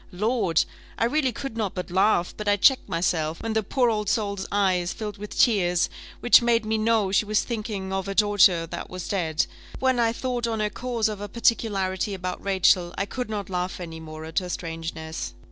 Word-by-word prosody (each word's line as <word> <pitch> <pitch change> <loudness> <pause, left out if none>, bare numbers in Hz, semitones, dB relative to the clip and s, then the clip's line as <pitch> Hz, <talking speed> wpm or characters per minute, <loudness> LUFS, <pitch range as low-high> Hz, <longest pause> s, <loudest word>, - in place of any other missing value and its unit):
Lord! 200 -3 +1 0.3
I 230 - +2
really 265 +1 +1
could 260 0 -6
not 215 -4 -2
but 180 0 -5
laugh; 185 -1 +2
but 210 - -6
I 205 - +5
checked 260 +3 +4
myself, 165 -2 -1
when 225 -1 -2
the 220 - +2
poor 240 +3 +1
old 210 -2 -1
soul's 200 -3 -1
eyes 185 -3 +1
filled 210 -2 -6
with 210 0 -7
tears, 180 -7 +3 0.3
which 245 - +7
made 235 -2 +2
me 220 0 0
know 215 -3 +2
she 200 - +3
was 210 0 +1
thinking 210 -5 -4
of 190 0 -2
her 195 - -3
daughter 200 -5 +4
that 165 - -7
was 185 -1 -6
dead. 165 -6 0 0.3
When 260 -2 +1
I 230 -1 +3
thought 245 0 -2
on 225 -1 -1
the 210 -1 -1
cause 235 -1 -1
of 210 -2 -4
her 205 - -5
particularity 205 -4 0
about 180 -1 -5
Rachel, 185 -2 +2
I 195 - 0
could 250 +3 -5
not 205 -3 -3
laugh 180 +1 -2
any 165 -2 -7
more 155 0 -8
at 160 +3 0
her 180 -1 -7
strangeness. 165 - -5
200 Hz, 205 wpm, -25 LUFS, 180-225 Hz, 0.3 s, which